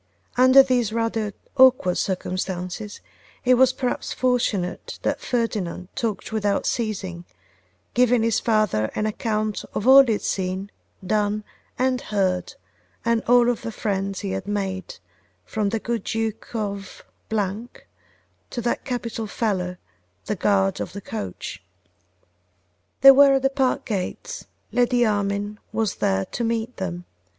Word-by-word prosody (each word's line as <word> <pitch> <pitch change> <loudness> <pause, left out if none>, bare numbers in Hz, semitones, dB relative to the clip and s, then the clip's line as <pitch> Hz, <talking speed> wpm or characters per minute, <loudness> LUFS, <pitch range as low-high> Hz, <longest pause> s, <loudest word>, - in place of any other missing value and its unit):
Under 255 +2 +8
these 250 -5 +1
rather 225 -2 -1 0.3
awkward 255 -9 +5
circumstances, 185 +2 -3 0.4
it 255 - +6
was 255 0 +5
perhaps 255 -1 -3
fortunate 235 -8 -1
that - - -1
Ferdinand 205 -7 -2
talked 225 -3 -3
without 205 -2 0
ceasing, 195 -7 -2 0.7
giving 245 -1 +3
his 230 -1 +2
father 215 - +1
an 215 - 0
account 215 0 -1
of 210 - -1
all 270 +1 +10
he 235 -4 +1
had 210 - -3
seen, 190 +1 -2 0.3
done, 210 +1 0 0.3
and 255 0 +1
heard, 190 -3 -1 0.5
and 230 -1 +2
of - - -10
all 245 0 +6
the 230 0 -6
friends 195 -2 -2
he 195 - -3
had - - -4
made, 195 -3 -3 0.5
from 210 - -1
the 225 - -1
good 225 0 -3
Duke 225 +1 -3
of 200 -3 -4 0.3
to 220 +3 -6
that 235 0 -1
capital 230 -3 -3
fellow, 185 -5 -2 0.5
the 210 - -1
guard 195 0 +2
of - - -5
the 200 - -6
coach. 95 - -6 1.4
They 275 - +11
were 275 0 +7
at 270 - 0
the 270 - +3
park 270 -2 0
gates: 215 - -4 0.3
Lady 245 0 +3
Armine 205 0 -1
was 220 -3 -1
there 95 0 +1
to 240 - -4
meet 230 +1 -2
them. 180 -2 -4
215 Hz, 135 wpm, -23 LUFS, 195-240 Hz, 1.4 s, They